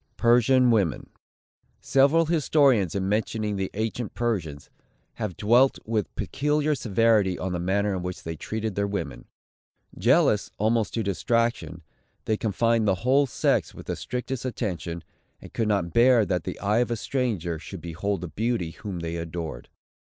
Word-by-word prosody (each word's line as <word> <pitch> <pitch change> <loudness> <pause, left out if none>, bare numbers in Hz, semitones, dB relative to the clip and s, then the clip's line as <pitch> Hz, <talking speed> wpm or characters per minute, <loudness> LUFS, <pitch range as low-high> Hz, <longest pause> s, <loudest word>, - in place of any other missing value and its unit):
PERSIAN 125 +1 +4
WOMEN. 100 -8 0 0.7
Several 140 +5 +3
historians, 140 - +3
in 95 -1 -1
mentioning 105 0 -1
the 95 -1 -2
ancient 110 +1 -3
Persians, 90 -12 -2 0.5
have 105 -5 -3
dwelt 120 +6 +4
with 110 -1 -2
peculiar 150 +2 0
severity 110 -6 +2
on 95 - -3
the 90 - -2
manner 100 +3 0
in 90 - -3
which 90 0 -6
they 80 0 -5
treated 110 +6 -4
their 100 +1 -1
women. 95 -8 -5 0.7
Jealous, 120 - +3
almost 110 +1 +1
to 115 - 0
distraction, 115 -3 -1 0.4
they 110 - +1
confined 115 +1 +1
the 95 - +3
whole 140 +2 +4
sex - - 0
with - - -10
the - - -3
strictest 125 0 -4
attention, 90 - -4 0.4
and - - -13
could 115 - 0
not 100 -5 0
bear 120 -2 +5
that 90 -4 -2
the - - -5
eye 105 +3 +1
of 120 - +1
a 120 - 0
stranger 105 - -2
should 95 +3 -8
behold 85 +3 -3
the 90 - -4
beauty 110 -2 -2
whom 95 -2 -7
they 85 0 -4
adored. 85 -1 -6
105 Hz, 155 wpm, -25 LUFS, 90-120 Hz, 0.7 s, bear